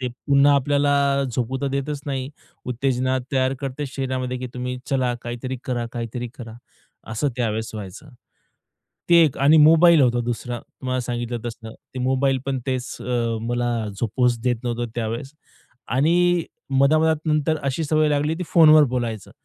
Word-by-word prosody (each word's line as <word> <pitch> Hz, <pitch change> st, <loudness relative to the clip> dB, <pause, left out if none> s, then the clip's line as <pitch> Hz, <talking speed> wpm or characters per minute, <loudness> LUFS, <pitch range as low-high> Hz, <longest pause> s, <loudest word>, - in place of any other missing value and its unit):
ते 125 Hz, -, -2 dB, 0.2 s
पुन्हा 140 Hz, 0 st, +5 dB
आपल्याला 145 Hz, +1 st, +2 dB, 0.4 s
झोपू 125 Hz, +2 st, -2 dB
तर 140 Hz, -, -1 dB
देतच 140 Hz, +1 st, -3 dB
नाही. 135 Hz, -1 st, -3 dB, 0.4 s
उत्तेजना 130 Hz, +1 st, 0 dB
तयार 130 Hz, 0 st, +1 dB
करते 140 Hz, +1 st, -4 dB
शरीरामध्ये, 130 Hz, -1 st, -3 dB
की 125 Hz, -, -5 dB
तुम्ही 125 Hz, 0 st, -4 dB
चला 130 Hz, -3 st, 0 dB
काहीतरी 120 Hz, +2 st, -5 dB
करा, 120 Hz, -2 st, -2 dB
काहीतरी 120 Hz, +1 st, -4 dB
करा 115 Hz, -2 st, -8 dB, 0.6 s
असं 110 Hz, +6 st, 0 dB
त्यावेळेस 110 Hz, -2 st, -2 dB
व्हायचं. 105 Hz, +7 st, -8 dB, 1.0 s
ते 170 Hz, -, +8 dB
एक 150 Hz, -, -1 dB
आणि 145 Hz, +3 st, +5 dB
मोबाईल 165 Hz, +1 st, +6 dB
होता 120 Hz, -1 st, +2 dB
दुसरा. 120 Hz, +1 st, -3 dB
तुम्हाला 130 Hz, 0 st, -5 dB
सांगितलं 120 Hz, 0 st, -3 dB
तसं. 115 Hz, -1 st, -7 dB
ते 130 Hz, -, -12 dB
मोबाईल 135 Hz, 0 st, +2 dB
पण 135 Hz, -1 st, -1 dB
तेच 130 Hz, -1 st, -3 dB
अ, 120 Hz, -2 st, -1 dB
मला 120 Hz, 0 st, 0 dB, 0.3 s
झोपूच 120 Hz, +1 st, +1 dB
देत 125 Hz, -1 st, +1 dB
नव्हतं 120 Hz, -1 st, -2 dB
त्यावेळेस. 115 Hz, +4 st, -3 dB, 0.6 s
आणि 170 Hz, +6 st, +2 dB, 0.3 s
मधा-मधात 155 Hz, +3 st, +4 dB
नंतर 155 Hz, 0 st, +1 dB
अशी 140 Hz, +3 st, -1 dB
सवय 155 Hz, 0 st, +2 dB
लागली 150 Hz, +2 st, 0 dB
की 180 Hz, -, -4 dB
फोनवर 155 Hz, -2 st, +7 dB
बोलायचं. 115 Hz, -5 st, -3 dB
130 Hz, 150 wpm, -22 LUFS, 120-145 Hz, 1.0 s, ते